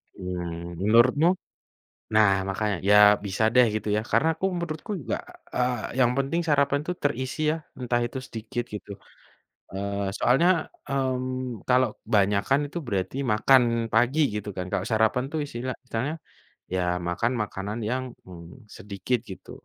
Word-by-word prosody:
Mmm, 85 Hz, -2 st, -5 dB
menurutmu? 120 Hz, -, +5 dB, 0.8 s
Nah, 110 Hz, -1 st, +6 dB, 0.2 s
makanya. 100 Hz, 0 st, -1 dB
Ya, 105 Hz, -, +6 dB, 0.3 s
bisa 100 Hz, +2 st, -1 dB
deh, 125 Hz, 0 st, +7 dB
gitu, 110 Hz, 0 st, -3 dB
ya. 105 Hz, -, +1 dB
Karena 160 Hz, -, +3 dB
aku 175 Hz, -, -2 dB
menurutku 170 Hz, +1 st, -4 dB
juga, -, -, -2 dB, 0.4 s
eee, 125 Hz, -1 st, -1 dB
yang 120 Hz, -1 st, +4 dB
penting 140 Hz, +5 st, 0 dB
sarapan 140 Hz, -2 st, +2 dB
tuh 180 Hz, -, -1 dB
terisi 130 Hz, 0 st, -2 dB
ya, -, -, -3 dB, 0.2 s
entah 120 Hz, -1 st, 0 dB
itu 120 Hz, +3 st, -5 dB
sedikit, 120 Hz, 0 st, -5 dB
gitu. 105 Hz, -1 st, -8 dB, 0.8 s
Eee, 100 Hz, 0 st, -2 dB
soalnya, 165 Hz, +7 st, +3 dB, 0.2 s
mmm, 130 Hz, -3 st, -2 dB
kalau 125 Hz, -1 st, +4 dB, 0.2 s
kebanyakan 105 Hz, +6 st, +2 dB
itu -, -, -5 dB
berarti 95 Hz, -1 st, -2 dB, 0.2 s
makan 130 Hz, +4 st, +5 dB, 0.3 s
pagi, 120 Hz, +7 st, +3 dB, 0.2 s
gitu 105 Hz, 0 st, -4 dB
kan. 90 Hz, -, -3 dB
Kalau 95 Hz, -, -1 dB
sarapan 110 Hz, +3 st, +2 dB
tuh 160 Hz, -, -2 dB
isilah 130 Hz, -2 st, -4 dB
istilahnya, 130 Hz, +5 st, -3 dB, 0.6 s
ya, 95 Hz, -, +1 dB, 0.3 s
makan 115 Hz, +8 st, 0 dB
makanan 105 Hz, +1 st, -5 dB
yang, 130 Hz, +1 st, -1 dB, 0.2 s
mmm, 90 Hz, +7 st, -12 dB
sedikit, 105 Hz, +5 st, -3 dB
gitu. 95 Hz, -4 st, -11 dB
120 Hz, 145 wpm, -26 LUFS, 100-130 Hz, 0.8 s, deh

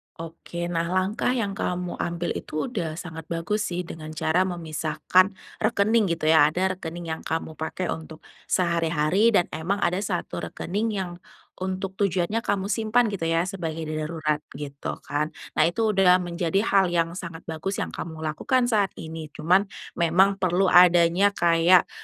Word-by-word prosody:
Oke. 165 Hz, +1 st, -6 dB
Nah 170 Hz, 0 st, 0 dB
langkah 185 Hz, +5 st, 0 dB
yang 215 Hz, -5 st, -1 dB
kamu 180 Hz, -2 st, -3 dB
ambil 170 Hz, 0 st, -2 dB
itu 155 Hz, -, -4 dB
sudah 170 Hz, -9 st, -3 dB
sangat 160 Hz, -2 st, -8 dB
bagus 195 Hz, +6 st, -1 dB
sih 180 Hz, 0 st, -3 dB
dengan 160 Hz, -2 st, -8 dB
cara 175 Hz, +5 st, +2 dB
memisahkan 170 Hz, +2 st, +1 dB, 0.2 s
rekening 215 Hz, 0 st, +2 dB
gitu 155 Hz, -1 st, +1 dB
ya. 160 Hz, -2 st, +7 dB
Ada 185 Hz, +3 st, -1 dB
rekening 170 Hz, 0 st, -6 dB
yang 160 Hz, -, -4 dB
kamu 160 Hz, 0 st, -3 dB
pakai 165 Hz, +3 st, -3 dB
untuk 160 Hz, 0 st, -7 dB, 0.2 s
sehari-hari, 170 Hz, +4 st, +2 dB
dan 175 Hz, -, +4 dB
emang 165 Hz, +6 st, -1 dB
ada 180 Hz, +2 st, +1 dB
satu 175 Hz, -, -3 dB
rekening 205 Hz, -, -3 dB
yang 190 Hz, -3 st, -3 dB, 0.5 s
untuk 190 Hz, +1 st, -4 dB
tujuannya 200 Hz, +3 st, 0 dB
kamu 200 Hz, -1 st, -1 dB
simpan 225 Hz, +3 st, +2 dB
gitu 195 Hz, -5 st, -3 dB
ya 165 Hz, 0 st, +2 dB
sebagai 165 Hz, -4 st, -4 dB
darurat, 155 Hz, -1 st, -1 dB, 0.2 s
gitu 140 Hz, 0 st, -5 dB
kan. 150 Hz, +2 st, -2 dB, 0.2 s
Nah 155 Hz, -, +5 dB
itu 220 Hz, +7 st, +1 dB
sudah 185 Hz, -3 st, +5 dB
menjadi 175 Hz, +1 st, 0 dB
hal 195 Hz, -3 st, +3 dB
yang 170 Hz, -1 st, 0 dB
sangat 170 Hz, -2 st, -7 dB
bagus 175 Hz, +5 st, -3 dB
yang -, -, -3 dB
kamu 160 Hz, -2 st, -7 dB
lakukan 240 Hz, +11 st, 0 dB
saat 205 Hz, -5 st, +2 dB
ini, 160 Hz, 0 st, -7 dB
cuman, 180 Hz, +6 st, +3 dB, 0.3 s
memang 185 Hz, +4 st, +3 dB
perlu 185 Hz, 0 st, +2 dB
adanya 175 Hz, +2 st, +6 dB
kayak, 170 Hz, 0 st, +4 dB
175 Hz, 160 wpm, -25 LUFS, 160-195 Hz, 0.5 s, ya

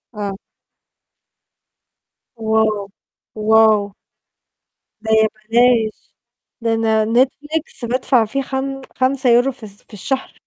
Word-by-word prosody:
آه. 200 Hz, -2 st, -4 dB, 2.0 s
wow 220 Hz, -2 st, 0 dB, 0.5 s
!wow! 215 Hz, -2 st, +3 dB, 1.1 s
ده 220 Hz, 0 st, -4 dB
يا 220 Hz, 0 st, +4 dB, 0.2 s
بلاش. 235 Hz, -2 st, +2 dB, 0.5 s
ده 230 Hz, 0 st, 0 dB
أنا 220 Hz, -1 st, +1 dB
Netflix 280 Hz, +1 st, -1 dB
بادفع 250 Hz, -1 st, +2 dB
فيه 275 Hz, +6 st, -2 dB
خم 270 Hz, +1 st, -4 dB
خمسة 260 Hz, 0 st, +1 dB
يورو 245 Hz, +3 st, +4 dB
في 245 Hz, -3 st, -14 dB
الس 205 Hz, -1 st, -12 dB
في -, -, -23 dB
الشهر. 265 Hz, +7 st, -4 dB
225 Hz, 105 wpm, -18 LUFS, 220-260 Hz, 2.0 s, يا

